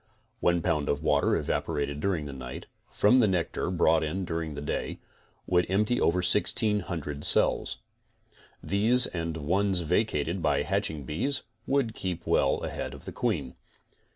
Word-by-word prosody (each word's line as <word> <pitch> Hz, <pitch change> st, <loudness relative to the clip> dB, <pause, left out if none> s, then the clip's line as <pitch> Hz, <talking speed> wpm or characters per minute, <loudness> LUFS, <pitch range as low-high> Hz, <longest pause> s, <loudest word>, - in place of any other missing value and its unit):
One 85 Hz, -1 st, +1 dB
pound 75 Hz, -5 st, 0 dB
of 70 Hz, +2 st, -1 dB
water 75 Hz, -2 st, +2 dB
evaporated 70 Hz, -2 st, -2 dB
during 85 Hz, -3 st, -1 dB
the 70 Hz, -, -7 dB
night, 65 Hz, -2 st, -8 dB, 0.2 s
from 125 Hz, +5 st, +4 dB
the 115 Hz, -, +4 dB
nectar 90 Hz, -2 st, -1 dB
brought 85 Hz, -2 st, +3 dB
in 90 Hz, +5 st, -3 dB
during 80 Hz, -3 st, -4 dB
the 75 Hz, -, -6 dB
day, 75 Hz, -, -3 dB, 0.5 s
would 90 Hz, -1 st, +1 dB
empty 105 Hz, +5 st, +1 dB
over 90 Hz, +2 st, +2 dB
1600 85 Hz, -9 st, +1 dB
cells. -, -, +3 dB, 0.9 s
These 115 Hz, +6 st, +5 dB
and 85 Hz, -2 st, -4 dB
the 80 Hz, -, -6 dB
ones 95 Hz, +4 st, +1 dB
vacated 85 Hz, -1 st, 0 dB
by 75 Hz, -3 st, +1 dB
hatching 75 Hz, -3 st, -2 dB
bees 110 Hz, -, -2 dB, 0.2 s
would 135 Hz, -5 st, +1 dB
keep 90 Hz, -5 st, -4 dB
well -, -, +1 dB
ahead -, -, -5 dB
of -, -, -14 dB
the -, -, -6 dB
queen. 65 Hz, -, -2 dB
85 Hz, 155 wpm, -27 LUFS, 75-100 Hz, 0.9 s, These